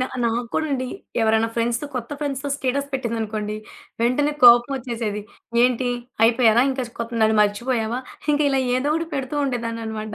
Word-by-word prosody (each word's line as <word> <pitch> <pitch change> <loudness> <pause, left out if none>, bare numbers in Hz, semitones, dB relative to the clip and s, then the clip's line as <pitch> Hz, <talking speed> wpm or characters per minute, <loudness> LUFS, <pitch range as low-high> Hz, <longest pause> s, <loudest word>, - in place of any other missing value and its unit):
నా 255 - +1 0.2
నాకు 235 +1 0
కూడా 315 - +1
అండి. 255 -1 -1 0.3
ఎవరైనా 220 0 +3
ఫ్రెండ్స్‌తో 235 +3 -1
కొత్త 235 -2 -4
ఫ్రెండ్స్‌తో 285 -1 -3
స్టేటస్ 280 +1 -1
పెట్టిందనుకోండి, 220 -4 -3 0.5
వెంటనే 285 +5 +2
కోపమొచ్చేసేది. 240 -3 +4 0.4
ఏంటి? 250 0 +1 0.4
అయిపోయారా? 230 0 +5
ఇంకా 265 -1 -2
స్ - - -19
కొ 235 - -1 0.2
నన్ను 220 0 +3
మర్చిపోయావా? 225 +3 -1 0.3
ఇంక 295 - +1
ఇలా 270 -1 +1 0.2
ఏదో 275 +3 0
ఒకటి 330 +1 -1
పెడుతూ 270 +1 -3
ఉండేదాన్ననమాట. 230 -3 -4
240 Hz, 150 wpm, -22 LUFS, 225-265 Hz, 0.5 s, అయిపోయారా